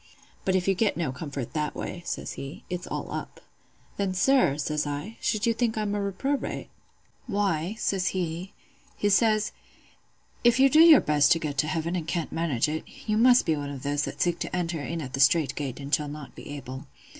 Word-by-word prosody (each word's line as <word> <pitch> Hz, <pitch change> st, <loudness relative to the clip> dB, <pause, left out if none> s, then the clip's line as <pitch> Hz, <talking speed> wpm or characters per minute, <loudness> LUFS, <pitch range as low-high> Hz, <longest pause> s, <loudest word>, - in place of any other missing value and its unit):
"'But 190 Hz, -, +2 dB
if 185 Hz, 0 st, 0 dB
you 195 Hz, -, +4 dB
get 205 Hz, +2 st, +1 dB
no 160 Hz, -6 st, -1 dB
comfort 140 Hz, -2 st, -6 dB
that 150 Hz, -1 st, -2 dB
way,' 175 Hz, -, -5 dB
says -, -, -3 dB
he, 135 Hz, +1 st, -8 dB
'it's 180 Hz, 0 st, -4 dB
all -, -, -4 dB
up.' -, -, -6 dB, 0.6 s
"'Then, 195 Hz, -2 st, -1 dB
sir,' 180 Hz, -, +3 dB
says 150 Hz, 0 st, -1 dB
I, 145 Hz, +10 st, -5 dB
'should 210 Hz, -1 st, 0 dB
you 230 Hz, -, +3 dB
think 225 Hz, -1 st, 0 dB
I'm 210 Hz, -1 st, -1 dB
a 205 Hz, -, -1 dB
reprobate?' 265 Hz, +9 st, -2 dB, 0.6 s
"'Why,' 195 Hz, -2 st, 0 dB
says 190 Hz, -5 st, 0 dB
he—he 180 Hz, +3 st, -4 dB
says, 215 Hz, +1 st, +3 dB, 0.9 s
'if 240 Hz, +1 st, +5 dB
you 270 Hz, 0 st, +6 dB
do 310 Hz, -, +6 dB
your 325 Hz, -4 st, +9 dB
best 150 Hz, +1 st, +3 dB
to -, -, 0 dB
get 150 Hz, -3 st, -3 dB
to 150 Hz, -, +2 dB
heaven 165 Hz, +3 st, -1 dB
and 165 Hz, -3 st, -3 dB
can't 170 Hz, -1 st, -2 dB
manage 160 Hz, -8 st, 0 dB
it, 155 Hz, +1 st, -3 dB, 0.2 s
you 215 Hz, -, +1 dB
must 245 Hz, +3 st, +6 dB
be 160 Hz, -, +2 dB
one 145 Hz, -1 st, -4 dB
of 140 Hz, -2 st, -7 dB
those 145 Hz, 0 st, 0 dB
that -, -, -2 dB
seek 175 Hz, -1 st, 0 dB
to -, -, -3 dB
enter 170 Hz, -3 st, -2 dB
in 165 Hz, +2 st, -4 dB
at 130 Hz, -1 st, -8 dB
the 135 Hz, -, -3 dB
strait 140 Hz, 0 st, +4 dB
gate 140 Hz, -3 st, -4 dB
and 140 Hz, +1 st, -7 dB
shall 150 Hz, -, +2 dB
not 145 Hz, -2 st, -8 dB
be -, -, -11 dB
able. 135 Hz, -1 st, -7 dB
170 Hz, 210 wpm, -27 LUFS, 145-205 Hz, 0.9 s, your